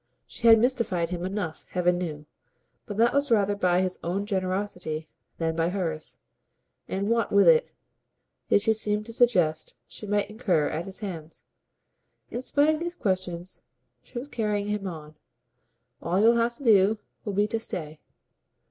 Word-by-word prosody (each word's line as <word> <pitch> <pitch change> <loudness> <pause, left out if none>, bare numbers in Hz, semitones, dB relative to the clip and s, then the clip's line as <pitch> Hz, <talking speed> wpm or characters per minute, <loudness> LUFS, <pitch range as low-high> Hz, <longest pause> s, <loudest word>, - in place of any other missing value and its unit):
She 235 - -2
had 225 0 +9
mystified 215 -8 0
him 175 -1 -3
enough, 185 -4 -4
heaven 180 -1 +1
knew, 155 -4 -5 0.6
but 205 -3 -6
that 235 +2 +4
was 280 0 +1
rather 205 -3 +3
by 180 -2 +2
his 185 -1 -2
own 190 +4 -1
generosity 185 -5 -2 0.3
than 165 -1 -1
by 165 +1 +1
hers. 165 -5 -3 0.7
And 195 +1 -2
what, 230 -1 +1
with 200 0 +5
it, 480 0 +5 0.8
did 205 - +4
she 220 0 +4
seem 210 -1 -1
to 230 +1 -9
suggest 180 -11 +2
she 210 - -9
might 205 0 +1
incur 190 -9 +1
at 165 +3 -3
his 195 +2 -7
hands? 165 -6 -7 0.9
In 240 - -3
spite 290 +4 +3
of 310 - -3
these 345 +1 -4
questions 185 - -3 0.4
she - - -11
was 250 +4 -4
carrying 210 -5 -1
him 210 -2 -2
on. 155 -4 -8 0.9
"All 175 +3 0
you'll 225 +3 +6
have 235 0 +1
to 275 - -12
do 215 -2 +5 0.3
will 205 - -3
be 205 +2 +3
to 225 - -1
stay." 155 -8 -5
200 Hz, 165 wpm, -26 LUFS, 175-225 Hz, 0.9 s, had